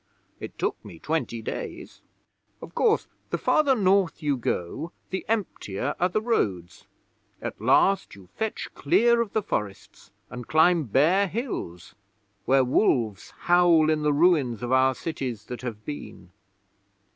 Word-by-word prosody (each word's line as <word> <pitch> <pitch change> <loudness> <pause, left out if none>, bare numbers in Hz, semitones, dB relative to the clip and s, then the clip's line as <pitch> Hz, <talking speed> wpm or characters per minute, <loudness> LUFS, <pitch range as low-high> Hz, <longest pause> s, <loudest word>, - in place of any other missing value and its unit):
It - - -9
took - - -2
me 85 - -11
twenty 135 - -3
days. - - -7 0.6
'Of - - -11
course, 455 -1 +2 0.2
the - - -1
farther 285 -3 +3
North 195 -6 +2
you 145 -2 +1
go 120 - -3 0.2
the 190 - -3
emptier 145 - -2
are 180 - +2
the 215 +4 -1
roads. 95 - -2 0.5
At - - -6
last 195 - +3
you 95 -2 -15
fetch 220 -1 -3
clear 235 +10 +3
of 225 -4 -4
the 220 - 0
forests 100 - -5 0.2
and 125 -1 -8
climb 160 0 +4
bare 165 - +3
hills, 165 - -5 0.5
where 135 0 +4
wolves 120 - +1
howl 175 -3 +4
in 155 -1 0
the 150 0 +2
ruins 145 - +2
of 120 - -3
our 130 0 +4
cities 125 -10 -5
that 125 - -7
have 110 -4 -7
been. 100 -10 -8
150 Hz, 145 wpm, -25 LUFS, 120-190 Hz, 0.6 s, climb